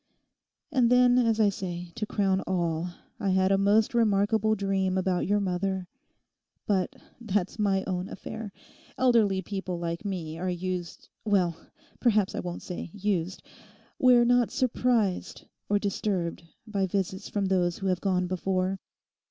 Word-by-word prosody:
And 250 -5 +3
then, 250 0 +5
as 230 -2 +2
I 210 -2 +5
say, 180 -3 -5
to 215 -2 -4
crown 195 -3 +1
all, 170 -2 -1 0.3
I 200 - 0
had 190 0 +3
a 195 - +4
most 210 +5 +3
remarkable 220 -1 +2
dream 195 -2 0
about 185 -2 0
your 205 +1 +2
mother. 190 -1 -1 0.8
But 190 -3 0 0.2
that's 205 -3 -2
my 195 -2 +2
own 185 0 -3
affair. 215 +2 -7 0.5
Elderly 220 -7 +3
people 190 -3 -4
like 170 +1 -4
me 170 -6 -4
are 185 +1 -1
used—well, 180 +1 -2 0.4
perhaps 215 -5 +2
I - - -3
won't 175 -1 -5
say 180 -1 -6
used—we're 210 +5 0
not 245 -1 +3
surprised 240 -6 0 0.2
or 205 - +3
disturbed 195 -4 -2 0.2
by 200 -3 -1
visits 190 +1 -2
from 205 -2 -1
those 180 -2 +1
who 195 - -6
have 185 -2 0
gone 185 -2 +1
before. 185 +1 -1
195 Hz, 140 wpm, -28 LUFS, 185-215 Hz, 0.8 s, then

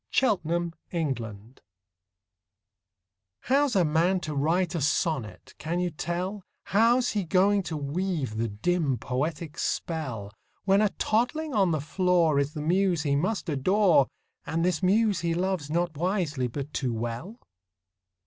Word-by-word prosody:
THE - - +4 0.2
POET 170 0 -2 0.2
AND 160 -6 0
THE 120 - -7
BABY 110 +2 -10 1.8
How's 275 -1 +2
a 185 -3 +4
man 170 +5 +2
to 155 -3 -4
write 165 +6 +1
a 165 - -2
sonnet, 145 -5 -1
can 170 +3 -2
you 180 -1 0
tell, 180 +5 -3 0.2
How's 235 +4 +3
he 205 -2 -1
going 195 +4 +3
to 165 -4 -4
weave 145 - -2
the 115 +1 0
dim, 140 - 0
poetic 150 +6 -3
spell, 125 -12 -3 0.3
When 195 +1 +4
a 210 - +3
toddling 250 +10 -1
on 195 -5 +3
the 155 -2 0
floor 170 -2 +2
Is 140 +1 -1
the 150 - -3
muse 180 -1 +2
he 140 -2 +1
must 185 +8 -1
adore, 170 +1 +3 0.4
And 165 +2 -1
this 180 -4 0
muse 205 0 +3
he 170 0 -1
loves, 180 -4 -1
not 170 +1 0
wisely, 165 -6 -1
but 140 +4 -6
too 125 -4 -1
well? 120 - -5
170 Hz, 150 wpm, -27 LUFS, 145-190 Hz, 1.8 s, THE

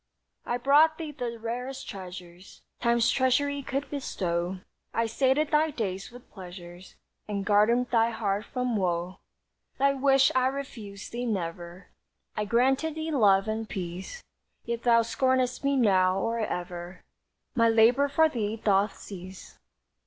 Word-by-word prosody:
"I 240 - 0
brought 295 +5 +4
thee 315 -3 -5
the 245 -4 -5
rarest 245 +4 -5
treasures 185 -2 -10 0.2
Time's 235 -1 +2
treasury 280 +2 +1
could 275 +1 -3
bestow; 180 -9 -3 0.3
I 230 - +2
sated 265 +6 +1
thy 310 +1 +3
days 195 -8 -4
with 245 0 -15
pleasures, 180 -1 -11 0.3
And 200 -2 -3
guarded 215 +4 +3
thy 230 -1 +3
heart 210 -2 -2
from 250 -3 -2
woe. 180 -1 -2 0.6
"Thy 275 +1 +3
wish 270 0 +4
I 255 0 +3
refused 235 -8 -6
thee 245 +1 -3
never. 175 -2 -5 0.5
I 210 - -1
granted 265 +8 +1
thee 320 0 -3
love 200 -7 +4
and 220 0 -3
peace; 185 - -6 0.4
Yet 235 0 -3
thou 230 -1 +4
scornest 255 +2 0
me 280 0 +2
now, 190 -6 +3
or 230 +4 -1
ever 180 -3 -5 0.5
My 230 -2 +3
labor 230 +5 +4
for 320 +3 +4
thee 220 -7 -2
doth 200 -1 +1
cease. 185 -1 -11
230 Hz, 140 wpm, -27 LUFS, 195-260 Hz, 0.6 s, brought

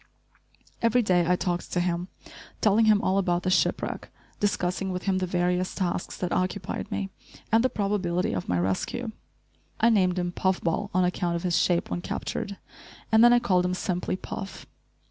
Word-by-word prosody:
Every 235 +1 +3
day 175 -4 +2
I 180 - +4
talked 175 -1 -2
to 180 - +1
him, 175 0 -1 0.5
telling 220 +1 +4
him 210 -1 +4
all 190 +1 +2
about 175 -2 0
the 185 - 0
ship 185 - +2
wreck, - - -5 0.3
discussing 190 -1 0
with 180 0 -4
him 190 -1 +1
the 185 - -1
various 180 +1 0
tasks 180 -2 -2
that 180 - -3
occupied 185 +2 -2
me, 195 -1 -3 0.4
and 225 +1 +4
the 260 - +3
probability 190 -5 -1
of 95 - -4
my 90 - +2
rescue. 95 - -1 0.7
I 230 - +5
named 185 -4 +3
him 175 -1 -1
Puff 185 +1 0
Ball 170 +5 -1
on 185 0 +2
account 175 -1 -1
of 170 - -3
his 175 -2 +2
shape 175 -1 +1
when 175 - -2
captured, 200 +2 -4 0.5
and 220 +1 +6
then 240 - +8
I 240 - +6
called 185 -6 +2
him 180 0 0
simply 180 0 -2
"Puff." 195 +1 -7
185 Hz, 185 wpm, -26 LUFS, 175-200 Hz, 0.7 s, then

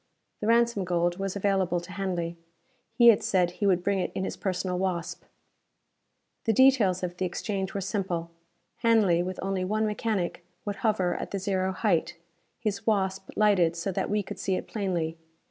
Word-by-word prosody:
The 210 - -3
ransom 235 -3 +3
gold 175 0 0
was 195 0 -2
available 190 -3 +1
to 175 +1 -11
Hanley. 180 -4 -2 0.6
He 235 -2 +8
had 220 - +5
said 180 -2 +2
he 200 +3 -1
would 180 -2 +2
bring 200 0 +1
it 180 - -2
in 190 - -1
his - - -3
personal 185 -1 -2
Wasp. 185 -3 -3 1.2
The 225 - +3
details 220 -8 +4
of 175 0 -3
the 185 - -1
exchange 195 +2 -3
were 200 - -1
simple. 185 -4 -2 0.5
Hanley, 215 -7 +3
with 185 +1 -4
only 190 -1 -1
one 215 +4 0
mechanic, 210 -4 -2 0.2
would 205 -1 -3
hover 205 -5 +1
at - - -5
the 200 - -3
zero 190 -1 0
height, 185 -4 0 0.4
his 210 -3 -3
Wasp 195 -2 0
lighted 190 -6 +3
so 170 +3 -2
that - - -2
we 210 0 +1
could - - -8
see 190 - 0
it - - -4
plainly. 170 -6 -2
190 Hz, 180 wpm, -27 LUFS, 180-205 Hz, 1.2 s, He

